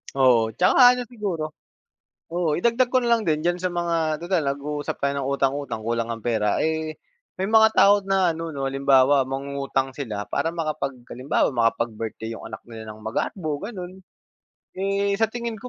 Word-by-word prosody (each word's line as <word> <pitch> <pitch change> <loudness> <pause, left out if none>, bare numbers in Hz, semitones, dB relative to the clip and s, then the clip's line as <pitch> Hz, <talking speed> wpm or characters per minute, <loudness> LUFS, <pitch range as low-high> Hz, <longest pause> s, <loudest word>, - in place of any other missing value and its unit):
Oo, 120 -4 +4
'tsaka 245 - +6
ano 250 - -3
siguro, 180 -10 -4 0.7
oo, 170 -3 0
idagdag 235 +8 +2
ko 255 - +4
na 240 - -1
lang 230 -3 +2
din, 155 -1 +1
diyan 175 +1 +1
sa 180 0 -3
mga 165 -2 -1
tutal 175 -4 0
nag-uusap 145 +1 -3
tayo 140 0 +1
ng 135 - -2
utang-utang, 140 -3 -1
kulang 115 +1 -2
ang 115 - -9
pera. 105 -3 0
Eh, 160 0 -1 0.5
may 195 - -1
mga 220 0 +6
tao 200 0 +5
na 190 -2 +2
ano, 165 -1 -4
'no, 135 -1 -2
halimbawa, 135 0 +4
mangungutang 135 0 -2
sila 105 -6 -5
para 165 +1 -1
makapag 155 -5 -2 0.2
halimbawa, 130 +3 0
makapag-birthday 115 -2 -1
'yong - - -11
anak - - -7
nila 110 -1 -8
ng 110 - -15
magarbo, 150 - -3
gano'n. 185 -4 -7 0.8
Eh, 200 +1 0
sa 225 - +3
tingin 235 -1 -5
ko, 250 - -7
155 Hz, 170 wpm, -24 LUFS, 135-190 Hz, 0.8 s, tsaka